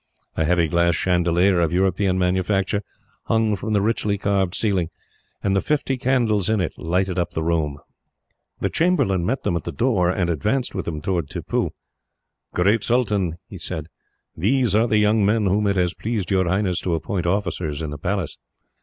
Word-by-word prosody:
A 80 - +1
heavy 85 0 +3
glass 85 +1 +2
chandelier, 90 +1 +2
of 85 -2 +1
European 95 +1 +1
manufacture, 95 +2 +1 0.4
hung 110 -2 +2
from 110 +3 -3
the 100 -1 +2
richly 105 -2 0
carved 95 -2 0
ceiling, 95 -6 0 0.5
and 100 -1 +1
the 95 - +2
fifty 145 -3 0
candles 120 -6 +1
in 110 -1 +2
it 90 - -1
lighted 90 +2 0
up 85 0 -2
the 80 - -2
room. 80 -4 0 0.8
The - - 0
chamberlain 140 - +2
met 135 - -1
them 85 - 0
at 85 - -2
the 85 - -4
door, 95 - +1
and 90 -1 0
advanced 105 - -1
with 95 - -3
them 80 -2 -4
towards 85 -4 -1
Tippoo. - - -2 0.8
"Great 100 +5 +2
Sultan," 105 -9 +1
he 95 - -9
said, 80 -1 -5 0.5
"these 115 +5 +1
are 115 +2 +4
the 110 - +2
young 105 0 +3
men 105 +1 +2
whom 100 +2 +2
it 100 - +1
has 90 -1 +1
pleased 110 -4 -3
your 95 -2 +2
Highness 95 -1 +1
to 85 -2 0
appoint 90 +1 -2
officers 85 -5 -1
in 75 - -4
the 75 - -6
Palace." - - -2
95 Hz, 180 wpm, -22 LUFS, 85-105 Hz, 0.8 s, are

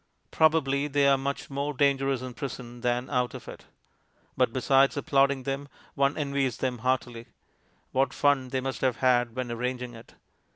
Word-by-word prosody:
Probably 150 -3 +2
they 140 -1 +2
are 140 - +6
much 140 +1 -4
more 140 +1 -2
dangerous 135 -1 +1
in 130 -1 -6
prison 120 -2 -7
than 125 +1 0
out 125 -2 0
of - - -10
it. - - -10 0.7
But 125 -3 +2
besides 135 +3 +3
applauding 140 -1 +2
them, 140 +1 -3 0.3
one 140 +1 +1
envies 140 -4 -1
them 125 -2 -2
heartily. 120 -1 -2 0.6
What 135 +1 +1
fun 140 -3 +2
they 130 0 -1
must 135 0 -4
have 130 -3 +2
had 125 -2 +2
when 130 -2 -3
arranging 125 +1 -3
it! 115 0 -14
135 Hz, 165 wpm, -27 LUFS, 125-140 Hz, 0.7 s, are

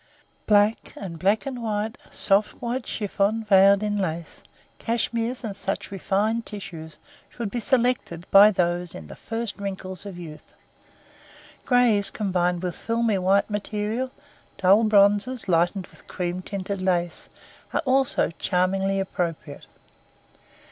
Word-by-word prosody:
Black, 210 +1 +3
and 170 -5 -7
black 200 - +2
and 260 -3 -5
white, 215 -1 -2
soft 200 +1 +1
white 240 +1 -3
chiffon 210 +1 -1
veiled 200 0 +5
in 205 -1 -1
lace, 170 -3 -4 0.4
cashmeres, 235 +1 -1
and 210 -4 -4
such 195 0 -4
refined 210 +4 0
tissues 165 -7 -8 0.3
should 230 -4 -5
be 245 - -2
selected 240 - 0
by 200 +2 +9
those 175 -3 -1
in 80 - -8
"the - - -10
first 225 -1 -5
wrinkles 190 -2 -5
of 190 -3 -8
youth." 160 -3 -11 1.1
Grays 240 -5 +4
combined 180 -3 -1
with 180 -1 -2
filmy 230 -3 0
white 190 +2 +3
material, 210 +4 -2 0.5
dull 195 +4 +5
bronzes 205 +3 +3
lightened 175 +2 +1
with - - -20
cream 180 0 -3
tinted 200 0 -4
lace, 175 -3 -1 0.4
are - - 0
also 265 -7 +2
charmingly 195 +1 +1
appropriate. 170 -6 -4
200 Hz, 125 wpm, -24 LUFS, 185-225 Hz, 1.1 s, by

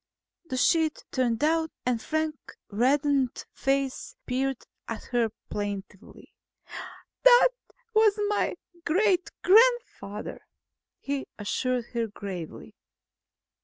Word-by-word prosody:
The 260 -5 -4
sheet 315 +3 +2
turned 245 -3 +1
down 320 +4 +2 0.2
and 245 -2 +1
Frank's 315 +1 -3 0.2
reddened 270 +3 +2
face 270 -1 -1
peered 265 0 -1 0.2
at 230 - -5
her 240 -2 +2 0.2
plaintively. 205 -2 -6 0.9
"That - - +8 0.4
was 435 -1 +4
my 415 0 0 0.3
great 370 +1 +2
grandfather," 445 - +3 0.6
he 280 -1 -3
assured 245 +3 -1
her 230 -1 0
gravely. 195 -6 -7
270 Hz, 90 wpm, -27 LUFS, 230-325 Hz, 0.9 s, That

